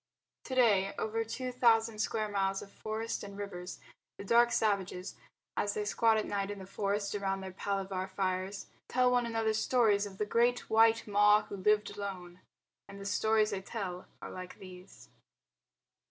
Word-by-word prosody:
To 260 - -4
day 205 -6 +3
over 225 +1 -1
two 250 +3 -4
thousand 225 -3 +3
square 215 0 0
miles 195 -1 -1
of 200 - -14
forest 220 +1 -4
and 200 -1 -9
rivers, 185 -3 -6 0.4
the - - -7
dark 235 +3 +4
savages, 195 -4 0 0.4
as 205 - -1
they 210 - -2
squat 225 +1 +3
at 215 - 0
night 200 -1 -2
in 205 - -5
the 190 - -8
forest 200 +1 -2
around 195 -1 -2
their 190 0 -6
palaver 190 0 -3
fires, 190 +1 -2 0.2
tell 250 0 +3
one 245 -1 +2
another 225 -1 0
stories 215 -3 +2
of 190 -1 -12
the 210 - -1
Great 240 +3 +2
White 225 0 +5
Ma 210 +1 +5
Who - - -8
Lived 210 +2 +2
Alone, 180 -3 -6 0.5
and 200 - -10
the 195 - -8
stories 220 +1 +2
they 195 - -3
tell 190 -3 -5 0.2
are - - -6
like 185 0 -8
these. 185 0 -13
205 Hz, 170 wpm, -32 LUFS, 195-225 Hz, 0.5 s, White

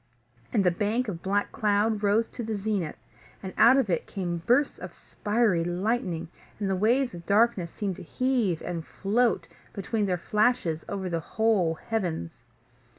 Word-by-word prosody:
And 200 - +2
the 180 - +4
bank 215 +7 0
of 175 -5 -5
black 200 +2 0
cloud 210 0 +1
rose 210 +2 +2
to - - -7
the 220 -2 -3
zenith, 195 -6 -2 0.5
and 190 - -6
out 250 +3 +7
of 265 - +2
it 170 -4 -1
came 175 -4 -3
bursts 265 +5 +3
of - - -8
spiry 210 -5 0
lightning, 180 -1 -1 0.3
and 195 -3 -1
waves 245 +3 +2
of 170 -1 -10
darkness 205 -4 +3
seemed 195 0 -4
to - - -9
heave 235 -4 0
and 170 -2 -4
float 225 +8 0 0.3
between 205 +1 -1
their 180 -1 0
flashes 210 -4 +1
over 195 -2 -3
the 170 -2 -1
whole 190 -2 +1
heavens. 175 - -4
205 Hz, 160 wpm, -27 LUFS, 175-225 Hz, 0.5 s, out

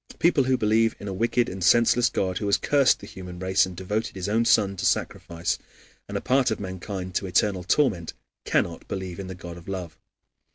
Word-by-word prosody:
People 155 -6 +3
who 130 0 +2
believe 110 +1 +2
in 100 - -7
a 95 - -3
wicked 120 +4 +1
and 95 0 -5
senseless 120 +4 +4
God 95 -1 -1
who 105 - -2
has 100 - +3
cursed 140 -2 +3
the - - -9
human 90 -1 -9
race 95 +1 +2
and 90 -2 -10
devoted 105 +4 -3
his 95 0 -4
own 115 +3 +2
Son 100 -4 +3
to - - -4
sacrifice, 85 0 -1 0.5
and - - -2
a - - -4
part 130 -1 +2
of 110 - -2
mankind 95 -1 -6
to 95 - -1
eternal 95 +1 +1
torment 95 - +1 0.3
cannot - - -1
believe 95 -1 -5
in 95 - -5
the 95 - -7
God 85 -1 -9
of 85 - -14
love. 90 -4 -6
95 Hz, 210 wpm, -25 LUFS, 90-115 Hz, 0.5 s, senseless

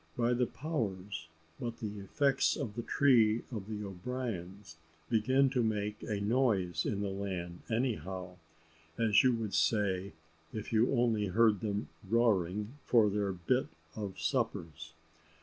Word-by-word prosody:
By 120 0 +2
the 125 0 +1
powers, 100 - -4 0.3
but 120 -1 -4
the 105 -2 -5
effects 135 +7 +2
of 130 -8 -4
the 120 - -3
tree 115 -4 +4
of 105 -5 -5
the 105 -1 -4
O'Briens 100 -3 -5 0.3
begin 130 +4 +3
to 130 -2 +1
make 105 -2 -1
a 105 -3 -2
noise 100 -7 +1
in 100 -2 -1
the 100 -1 -1
land, 95 -3 -4
anyhow, 95 - -2 0.6
as 115 -2 +5
you 130 - +5
would 110 -3 -4
say 100 -3 +1 0.4
if 110 +1 -6
you 115 +2 +4
only 115 -5 +2
heard 105 +1 +4
them 105 0 -2 0.2
roaring 105 +1 +1
for 110 -4 +4
their 100 -1 0
bit 95 +9 0 0.3
of 100 -3 -5
suppers. 80 0 -2
105 Hz, 140 wpm, -32 LUFS, 95-120 Hz, 0.6 s, as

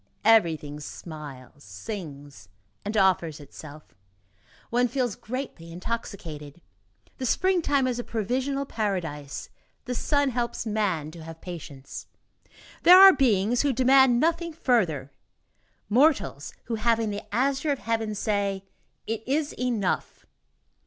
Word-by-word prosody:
Everything 160 -9 +3
smiles, 145 -4 -10
sings 140 - -8 0.3
and 210 +2 -3
offers 180 -6 +2
itself. 150 +1 -12 0.8
One 245 +1 +3
feels 245 -4 -1
gently 230 -9 -6
intoxicated. 170 -6 -6 0.6
The 255 - -1
springtime 325 -5 +2
is 250 -1 -1
a - - -3
provisional 260 +6 -2
paradise, 170 - -4 0.3
the 250 - -3
sun 285 +3 +1
helps 240 -1 -2
man 195 -8 -1
to 165 -1 -11
have 165 0 -10
patience. 150 -7 -8 0.7
There 360 +2 +9
are 385 0 +11
beings 235 - +2
who 285 -2 +1
demand 260 -1 +5
nothing 335 +2 0
further; 180 - 0 0.8
mortals, 250 - +2
who, 225 -1 -3
having 225 -1 +2
the 205 - -4
azure 270 +6 +1
of 280 - 0
heaven, 225 -3 -2
say: 200 -2 -1 0.4
"It 225 0 -3
is 290 +2 0
enough!" 235 -7 -2
215 Hz, 120 wpm, -26 LUFS, 165-255 Hz, 0.8 s, are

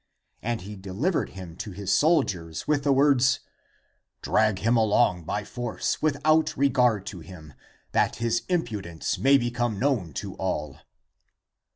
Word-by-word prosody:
And 115 -2 -2
he 105 +3 -8
delivered 100 - -2
him 90 -4 -10
to 105 -2 -6
his 100 0 -2
soldiers 95 - +1
with 150 -2 +1
the 140 - +4
words, 135 -2 +4 0.4
" - - -46
Drag 110 -2 +2
him 115 +5 +1
along 105 -6 +2
by 105 +5 -2
force 120 +1 -3
without 155 +1 +2
regard 125 -7 +2
to 95 -3 -7
him, 80 -2 -12 0.4
that - - +1
his 115 0 0
impudence 105 - -2
may 140 +1 +5
become 120 -3 -1
known 110 - 0
to 100 +3 -5
all." 75 -6 -3
110 Hz, 145 wpm, -26 LUFS, 95-135 Hz, 0.4 s, may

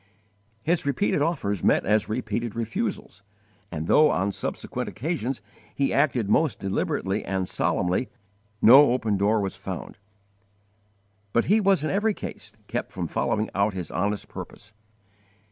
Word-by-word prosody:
His 170 +4 +1
repeated 145 +2 +1
offers 135 - -1
met - - +3
as 105 +1 +2
repeated 115 0 -2
refusals, 115 -4 -3 0.5
and 80 -1 -4
though 155 - +5
on 95 +3 0
subsequent - - -4
occasions 135 -3 -3 0.3
he 140 - +1
acted 130 -6 +2
most 150 +8 +2
deliberately 95 +1 -1
and 95 -1 -2
solemnly, 90 +8 0 0.5
no 130 +2 +8
open 115 -5 0
door 105 +3 +2
was 95 -1 -3
found, - - -7 1.3
but 120 - +3
he 215 +3 +4
was 195 -5 +3
in 155 - -1
every 205 +2 +1
case - - -8
kept - - -4
from - - -4
following 110 0 -1
out 100 0 +1
his 90 -4 -5
honest 100 +5 -1
purpose. 105 0 -10
110 Hz, 140 wpm, -25 LUFS, 100-145 Hz, 1.3 s, no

